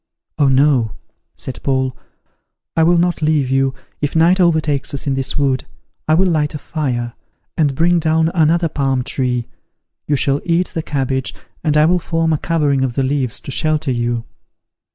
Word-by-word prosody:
"Oh 145 - +4
no," 130 -5 +3 0.4
said 130 - -7
Paul, 130 -2 0 0.8
"I 165 - +3
will 170 +2 +4
not 175 -1 +1
leave 150 -4 +1
you 135 0 +1 0.3
if 145 +1 -2
night 170 +4 +4
overtakes 155 -6 +1
us 135 - -2
in 140 - 0
this 135 0 -2
wood, 135 -3 0 0.4
I 155 - +4
will 185 +3 +3
light 155 -4 0
a - - -1
fire, 125 -7 -3 0.4
and 145 -5 +1
bring 170 +3 +3
down 160 0 +2
another 165 0 +3
palm 135 -4 -1
tree: 125 -2 -1 0.6
you 145 - +2
shall 140 +1 0
eat 175 +1 +1
the 165 - -2
cabbage, 135 -3 -2 0.3
and 150 -2 +2
I 150 - +5
will 180 +2 +3
form 165 -1 0
a 150 - 0
covering 145 -5 +1
of 125 -3 -2
the 135 - +1
leaves 130 -3 -1
to - - -7
shelter 155 -1 0
you." 120 -1 -1
145 Hz, 175 wpm, -18 LUFS, 130-160 Hz, 0.8 s, I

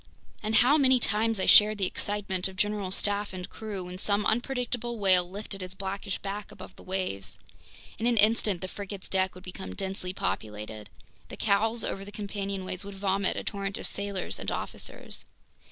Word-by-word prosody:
And 215 +1 0
how 260 +7 +6
many 260 -2 +5
times 220 0 +2
I - - +1
shared 215 0 +8
the 195 - +2
excitement 195 -1 0
of 190 - -10
general 205 0 0
staff 205 +1 0
and 180 -1 -5
crew 210 -4 -6
when 180 +1 -7
some 205 +1 +2
unpredictable 240 0 0
whale 185 -4 +4
lifted 200 0 -4
its 185 0 -6
blackish 195 0 -3
back 200 +1 -5
above 185 0 -11
the - - -14
waves. 185 - -2 0.6
In 230 - +1
an 240 -1 +3
instant 215 -3 +4
the 185 - -3
frigate's 200 0 -7
deck 190 -1 +1
would 185 - -11
become 190 +1 -7
densely 190 -2 -3
populated. 105 - -4 0.4
The - - -8
cowls 220 +2 +2
over 195 - -3
the 200 - -9
companionways 200 -2 -4
would 200 0 -8
vomit 195 0 +1
a - - -2
torrent 200 -1 -3
of - - -4
sailors 200 -1 -2
and - - -2
officers. - - -5
200 Hz, 180 wpm, -29 LUFS, 185-210 Hz, 0.6 s, shared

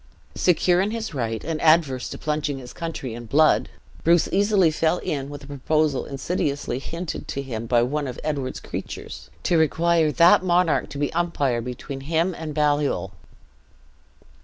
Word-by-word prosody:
Secure 180 0 +3
in 200 - 0
his 220 -4 -4
right, 115 -5 -2
and 160 -1 -3
averse 155 -6 +3
to - - -6
plunging 150 -2 -2
his 125 -2 -10
country 165 -8 -5
in 120 0 -8
blood, 155 +6 +3 0.3
Bruce 170 0 +4
easily 200 -4 +3
fell 160 +2 +1
in 140 -5 -3
with 145 0 -8
a - - -10
proposal 145 +1 0
insidiously 140 -3 -2
hinted 165 +4 -6
to - - -4
him 115 -4 -5
by 120 -1 +3
one 145 +3 -1
of 125 - -6
Edward's 140 -4 -2
creatures - - -7
'to 170 - +3
require 160 0 +2
that 170 +3 +6
monarch 175 -2 +2
to 140 - -7
be 145 0 -1
umpire 145 -8 0
between 125 +3 -6
him 165 +5 0
and 160 -3 -6
Baliol.' 145 -9 +1
150 Hz, 160 wpm, -24 LUFS, 135-170 Hz, 0.3 s, that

